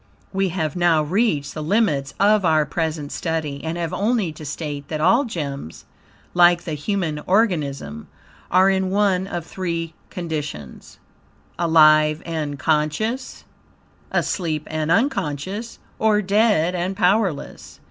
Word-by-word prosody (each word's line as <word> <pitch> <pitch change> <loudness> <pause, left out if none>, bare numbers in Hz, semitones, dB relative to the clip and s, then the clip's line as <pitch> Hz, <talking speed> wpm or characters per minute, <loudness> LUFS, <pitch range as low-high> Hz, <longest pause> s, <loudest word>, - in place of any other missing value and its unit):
We 195 0 +1
have 160 -3 -2
now 170 -3 +3
reached 155 - 0
the 155 - -5
limits 155 -6 0
of 205 0 +4
our 155 -3 +3
present 160 -3 -3
study, 155 -4 -3
and 165 +1 -3
have 170 -2 -3
only 210 -4 0
to 155 - -11
state 145 -1 -5
that 155 - -3
all 230 - +4
gems, 140 - -6 0.5
like 175 -1 +5
the 160 - -4
human 160 0 -2
organism, 150 - 0 0.4
are 185 +2 +5
in 190 -1 +1
one 195 -1 +1
of 175 -4 -4
three 170 -3 -4 0.2
conditions: 150 - -6 0.6
alive 155 -2 +5
and 155 -4 -3
conscious, 160 - -1 0.7
asleep 160 -5 -1
and 155 0 -2
UNCONSCIOUS, 205 - -1 0.2
or 210 -1 +3
dead 200 -4 +2
and 180 +2 -2
powerless. 190 -4 0
170 Hz, 125 wpm, -22 LUFS, 150-195 Hz, 0.7 s, like